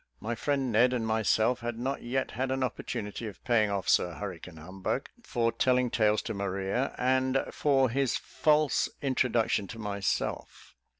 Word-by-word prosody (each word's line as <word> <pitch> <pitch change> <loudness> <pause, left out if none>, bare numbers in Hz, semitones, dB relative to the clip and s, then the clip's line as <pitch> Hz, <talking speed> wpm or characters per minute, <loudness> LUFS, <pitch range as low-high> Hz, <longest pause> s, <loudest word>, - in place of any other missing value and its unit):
My 115 +2 -3
friend 135 +2 -1
Ned 120 +4 +4
and 120 -3 -1
myself 110 +2 +2
had 120 -1 -4
not 130 +4 -2
yet 130 +2 -2
had 130 +3 -2
an 130 0 0
opportunity 110 -3 -4
of 105 - -10
paying 110 -4 +3
off 100 -2 -2
Sir 90 -2 +3
Hurricane 90 -4 -7
Humbug 95 - -4
for 120 - 0
telling 125 +1 +2
tales 110 -2 +2
to 110 - -4
Maria, 100 +5 -2
and 130 +1 +2
for 135 -3 +3
his 135 +1 0
false 150 -1 +2
introduction 120 -6 +1
to 115 - -8
myself. 100 -3 -3
120 Hz, 160 wpm, -29 LUFS, 105-130 Hz, -, Ned